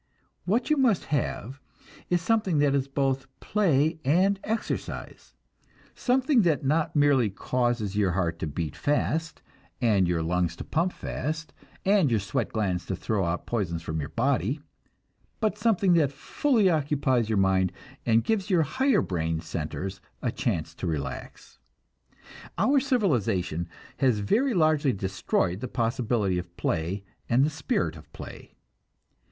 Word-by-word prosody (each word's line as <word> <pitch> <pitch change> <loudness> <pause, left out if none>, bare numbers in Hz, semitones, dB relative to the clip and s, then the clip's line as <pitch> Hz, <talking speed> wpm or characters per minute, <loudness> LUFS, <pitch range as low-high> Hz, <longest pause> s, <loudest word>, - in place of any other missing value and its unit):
What 230 - +1
you 305 - +4
must 245 -9 +3
have 135 -1 -2 0.5
is 175 -1 +1
something 205 -5 +2
that 145 -1 +3
is 140 -1 +1
both 135 -1 0
play 160 -6 +2
and 185 +8 +3
exercise; 225 +1 -4 0.6
something 260 0 +2
that 160 -7 +1
not 155 +4 +1
merely 145 -6 +4
causes 120 -1 -1
your 100 -4 +2
heart 85 -2 -1
to - - -2
beat 75 +1 -4
fast, 160 +2 -1 0.4
and 105 -7 +3
your 85 -2 0
lungs 85 0 0
to - - -7
pump 170 +3 0
fast, 155 +1 -4 0.3
and 195 -6 +4
your 115 -3 +2
sweat 110 +5 -2
glands 95 -5 -1
to 95 - -1
throw 100 +2 -1
out 85 +1 -2
poisons 85 -8 -2
from 80 0 -3
your 70 - -4
body, 130 +1 0 0.8
but 215 -2 +1
something 205 -4 +3
that 155 -5 +3
fully 230 - +1
occupies 140 -7 +1
your 110 - +1
mind 95 -1 +3 0.3
and 115 -1 +3
gives 215 -3 0
your 175 -4 +4
higher 260 - +2
brain 80 -2 -1
centers 80 +3 -5 0.2
a - - +1
chance 80 0 -2
to 90 - -5
relax. 70 -5 -5 1.0
Our 275 +1 +4
civilization 115 - 0 0.3
has 130 -5 +3
very 230 - +1
largely 155 -5 +3
destroyed 95 -1 -1
the 130 - -4
possibility 115 -5 0
of 90 -1 -10
play 85 +5 -1 0.3
and 125 +3 +4
the 155 - -1
spirit 160 - -1
of - - -14
play. - - -10
130 Hz, 145 wpm, -27 LUFS, -, 1.0 s, you